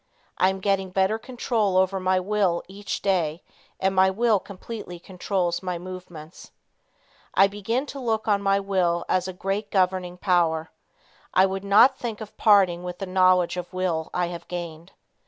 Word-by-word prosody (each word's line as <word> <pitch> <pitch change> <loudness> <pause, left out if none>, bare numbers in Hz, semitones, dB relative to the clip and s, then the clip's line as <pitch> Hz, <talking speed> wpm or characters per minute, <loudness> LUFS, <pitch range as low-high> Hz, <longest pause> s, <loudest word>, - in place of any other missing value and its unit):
I 185 - +5
am 190 0 -4
getting 195 -1 0
better 190 +4 +1
control 225 -5 -1
over 190 +1 +2
my 185 0 +2
will 190 -2 0
each 200 +2 -6
day, 175 -4 0 0.4
and 190 0 +1
my 190 0 +4
will 220 +1 +2
completely 200 -1 -8
controls 180 -1 -2
my 180 -2 -3
movements. 180 -2 -10 0.9
I 195 - +7
begin 205 +6 -2
to 280 -1 -8
look 225 -4 -1
on 205 -2 +2
my 195 0 +2
will 185 -3 0
as 185 0 0
a - - -3
great 195 +3 -3
governing 185 -2 0
power. 170 -3 +1 0.6
I 185 - +6
would 195 0 -3
not 225 +7 +5
think 230 -3 -4
of 215 -2 -9
parting 195 -5 +4
with 180 0 -6
the 195 - -4
knowledge 185 -1 +3
of 180 -1 -5
will 175 -4 -1
I 180 -1 -1
have 170 -1 -8
gained. 170 -1 -7
190 Hz, 170 wpm, -24 LUFS, 180-200 Hz, 0.9 s, I